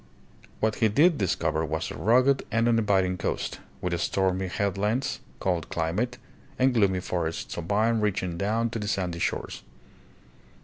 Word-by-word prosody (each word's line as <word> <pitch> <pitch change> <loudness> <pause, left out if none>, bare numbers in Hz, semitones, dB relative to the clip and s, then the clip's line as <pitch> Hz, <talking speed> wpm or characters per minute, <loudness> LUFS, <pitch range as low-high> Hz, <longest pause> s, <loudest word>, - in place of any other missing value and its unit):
What 110 -1 +1
he 110 - +4
did 155 - +4
discover 90 -4 0
was 80 0 -2
a - - -6
rugged 130 +5 +3
and 115 +1 +2
uninviting 100 -6 +2
coast, - - -2 0.2
with 85 -1 -1
stormy 95 0 0
head 100 +1 -1
lands, 105 +7 -1 0.2
cold 90 -5 -1
climate, 95 +10 -1 0.4
and 130 0 +3
gloomy 100 -5 +2
forests 85 -3 -3
of 85 -1 -5
pine 110 +3 +2
reaching 95 -4 -1
down 110 +5 0
to 115 - -3
the 105 - -4
sandy 90 -5 -1
shores. - - -2
100 Hz, 150 wpm, -27 LUFS, 90-115 Hz, 0.4 s, he